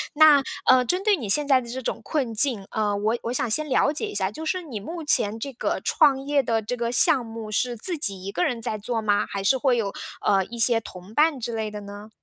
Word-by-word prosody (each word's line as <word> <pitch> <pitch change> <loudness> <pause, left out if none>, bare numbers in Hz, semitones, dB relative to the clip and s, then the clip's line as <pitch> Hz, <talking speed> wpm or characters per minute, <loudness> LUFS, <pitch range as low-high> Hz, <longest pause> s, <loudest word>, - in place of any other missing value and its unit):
那， 300 -2 +7 0.3
呃， 255 -1 +6
针 360 +9 -1
对 420 -2 +3
你 230 - -6
现 290 +8 +4
在 265 -2 +4
的 235 - -10
这 255 +2 -5
种 260 - -4
困 265 -7 -2
境， 220 -4 +1
呃， 210 -2 -1
我 215 +3 0
我 235 - -4
想 245 - -1
先 305 +5 +1
了 265 +2 +2
解 370 +8 -3
一 415 - -8
下 190 +1 0
就 315 - -8
是 370 +2 -2
你 255 -10 -7
目 325 - -7
前 220 -6 +4
这 275 +2 -6
个 - - -2
创 285 -3 +3
业 285 0 +2
的 230 -3 0
这 230 +4 -3
个 235 -1 -3
项 250 +1 +4
目 225 -1 -8
是 240 +3 -1
自 335 - -2
己 195 -7 0
一 195 - -5
个 180 - -1
人 240 -2 -1
在 215 -1 -4
做 230 +4 -4
吗？ - - -10 0.2
还 195 -1 -4
是 265 +7 +3
会 260 -1 +1
有， 200 -3 -2 0.3
呃， 195 -1 +3
一 235 - -10
些 230 0 +4
同 190 -2 -12
伴 300 0 +2
之 235 0 -4
类 220 -1 -3
的 210 0 -8
呢？ 205 +1 -10
235 Hz, 280 characters per minute, -24 LUFS, 215-285 Hz, 0.3 s, 那